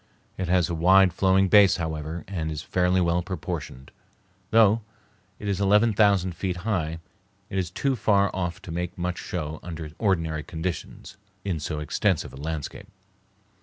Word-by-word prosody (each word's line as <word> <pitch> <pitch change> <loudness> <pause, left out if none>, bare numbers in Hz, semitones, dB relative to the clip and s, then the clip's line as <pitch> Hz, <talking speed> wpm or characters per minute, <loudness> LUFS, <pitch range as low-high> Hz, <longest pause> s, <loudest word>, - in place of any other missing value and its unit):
It 95 - -3
has 90 -2 +3
a - - -3
wide 90 +2 +5
flowing 95 +1 +3
base, 100 0 +6
however, 80 -1 -4
and 80 -5 -3
is 75 -1 -5
fairly 90 0 +1
well 85 0 +2
proportioned. 85 -7 -6 0.6
Though 110 0 +5 0.6
it 105 - -7
is 100 -1 -1
eleven 105 +3 +4
thousand 100 -4 +3
feet 90 +1 -3
high, 85 -7 -1 0.5
it 95 - 0
is 90 -3 -2
too 135 +9 0
far 100 -3 +2
off 90 -2 -3
to 85 - -8
make 90 +3 -4
much 90 0 -2
show 80 -3 -4
under 80 -3 -7
ordinary 80 -7 0
conditions 85 +4 -6 0.3
in 90 -5 -1
so 75 +1 -4
extensive 75 -2 0
a - - -10
landscape. 80 +5 -5
90 Hz, 160 wpm, -25 LUFS, 80-95 Hz, 0.6 s, base